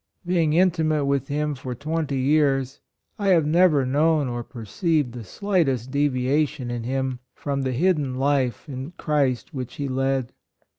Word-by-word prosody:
Being 170 Hz, -4 st, +2 dB
intimate 160 Hz, -4 st, +2 dB
with 140 Hz, -1 st, 0 dB
him 150 Hz, +1 st, -1 dB
for 130 Hz, -2 st, -6 dB
twenty 150 Hz, +1 st, -2 dB
years, 135 Hz, -1 st, +1 dB, 0.4 s
I 200 Hz, -, -1 dB
have 170 Hz, -5 st, +4 dB
never 155 Hz, -3 st, +4 dB
known 150 Hz, +2 st, +2 dB
or 120 Hz, -1 st, -3 dB
perceived 145 Hz, -, -1 dB
the 120 Hz, -1 st, -8 dB
slightest 135 Hz, -, -1 dB
deviation 140 Hz, -1 st, 0 dB
in 120 Hz, -1 st, -3 dB
him, 130 Hz, 0 st, -2 dB, 0.2 s
from 140 Hz, -1 st, -2 dB
the 130 Hz, -1 st, -1 dB
hidden 145 Hz, -2 st, +1 dB
life 135 Hz, -3 st, 0 dB
in 135 Hz, +3 st, -6 dB
Christ 145 Hz, -2 st, 0 dB
which 130 Hz, -3 st, -5 dB
he 140 Hz, -, -3 dB
led. 135 Hz, -1 st, -1 dB
140 Hz, 150 wpm, -24 LUFS, 130-155 Hz, 0.4 s, have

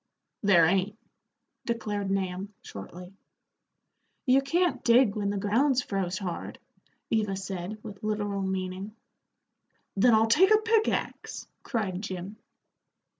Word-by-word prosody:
"There 190 Hz, -5 st, +6 dB
ain't," 195 Hz, +4 st, +1 dB, 0.7 s
declared 210 Hz, -4 st, -2 dB
Nahum, 195 Hz, +1 st, -2 dB
shortly. 180 Hz, -, -9 dB, 1.1 s
"You 265 Hz, +1 st, +5 dB
can't 345 Hz, +6 st, 0 dB
dig 235 Hz, -4 st, +5 dB
when 205 Hz, -2 st, -1 dB
the 205 Hz, -, -1 dB
ground's 250 Hz, +6 st, +2 dB
froze 190 Hz, -2 st, -2 dB
hard," 180 Hz, -4 st, -5 dB, 0.5 s
Eva 210 Hz, -3 st, +1 dB
said, 190 Hz, +1 st, -5 dB
with 205 Hz, -3 st, -9 dB
literal 205 Hz, -2 st, -1 dB
meaning. 190 Hz, +2 st, -3 dB, 1.0 s
"Then 225 Hz, +3 st, +5 dB
I'll 220 Hz, +1 st, +5 dB
take 320 Hz, +13 st, +5 dB
a 430 Hz, -, +8 dB
pickaxe," 440 Hz, 0 st, -1 dB
cried 195 Hz, -7 st, -2 dB
Jim. 190 Hz, 0 st, -6 dB
205 Hz, 115 wpm, -28 LUFS, 190-230 Hz, 1.1 s, a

